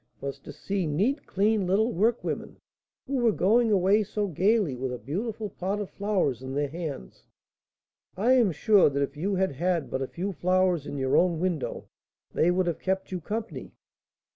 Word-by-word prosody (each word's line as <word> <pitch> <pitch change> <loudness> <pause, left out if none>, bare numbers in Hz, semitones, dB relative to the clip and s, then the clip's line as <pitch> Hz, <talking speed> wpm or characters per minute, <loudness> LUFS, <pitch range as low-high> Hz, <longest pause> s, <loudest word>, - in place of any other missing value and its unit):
was 140 0 -5
to - - -10
see 195 -4 -3
neat, 215 - 0
clean 205 0 +1
little 220 +6 +2
workwomen, 225 +6 -1 0.5
who 275 0 -2
were 240 -3 +3
going 220 +4 +3
away 200 +2 +4
so 210 0 -2
gaily 195 - +1
with 130 +1 -3
a 125 - -4
beautiful 205 - -4
pot 195 +3 -3
of 205 - -5
flowers 190 - -1
in 130 +1 -6
their 145 0 0
hands." 155 - -7 0.9
"I 235 +7 +3
am 240 -7 +4
sure 200 +3 +4
that 140 0 0
if 140 +1 -4
you 190 +7 -1
had 190 0 +1
had 170 +2 -1
but 130 - -2
a 135 - -2
few 190 +8 -4
flowers 180 -3 +1
in 145 - -5
your 130 -1 +1
own 175 -3 +3
window, 175 -4 -2 0.5
they 165 - +3
would 180 +1 +2
have 170 -2 -2
kept 190 0 -2
you 180 -2 -3
company." 220 +6 -5
185 Hz, 185 wpm, -27 LUFS, 150-210 Hz, 0.9 s, away